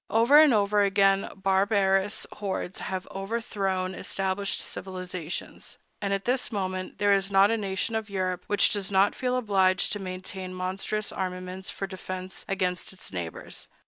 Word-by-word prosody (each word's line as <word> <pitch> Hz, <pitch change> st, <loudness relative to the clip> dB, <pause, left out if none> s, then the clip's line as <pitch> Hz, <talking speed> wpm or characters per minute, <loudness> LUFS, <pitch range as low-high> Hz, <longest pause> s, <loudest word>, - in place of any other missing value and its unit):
Over 230 Hz, +8 st, +6 dB
and 310 Hz, -2 st, +7 dB
over 205 Hz, -2 st, +3 dB
again 195 Hz, 0 st, +3 dB
barbarous 195 Hz, +1 st, +2 dB
hordes 195 Hz, -2 st, -3 dB
have 185 Hz, -1 st, -4 dB
overthrown 195 Hz, -2 st, -2 dB
established 195 Hz, +1 st, -1 dB
civilizations; 185 Hz, -3 st, -5 dB, 0.2 s
and 200 Hz, -1 st, -1 dB
at 195 Hz, 0 st, -1 dB
this 250 Hz, +1 st, +1 dB
moment 185 Hz, -3 st, -3 dB
there 205 Hz, -1 st, +4 dB
is 195 Hz, 0 st, +2 dB
not 195 Hz, +2 st, +5 dB
a -, -, +3 dB
nation 195 Hz, +1 st, -2 dB
of 220 Hz, -1 st, -2 dB
Europe 185 Hz, -2 st, -2 dB
which 205 Hz, -, +4 dB
does 200 Hz, -2 st, 0 dB
not 195 Hz, +1 st, +4 dB
feel 255 Hz, 0 st, -1 dB
obliged 190 Hz, -6 st, +2 dB
to 205 Hz, -, -2 dB
maintain 185 Hz, 0 st, -6 dB
monstrous 195 Hz, +3 st, -2 dB
armaments 185 Hz, 0 st, -4 dB
for 195 Hz, -, -4 dB
defense 185 Hz, -1 st, -6 dB
against 185 Hz, -2 st, -1 dB
its 190 Hz, -, -7 dB
neighbors. 85 Hz, -3 st, -5 dB
195 Hz, 150 wpm, -27 LUFS, 185-205 Hz, 0.2 s, and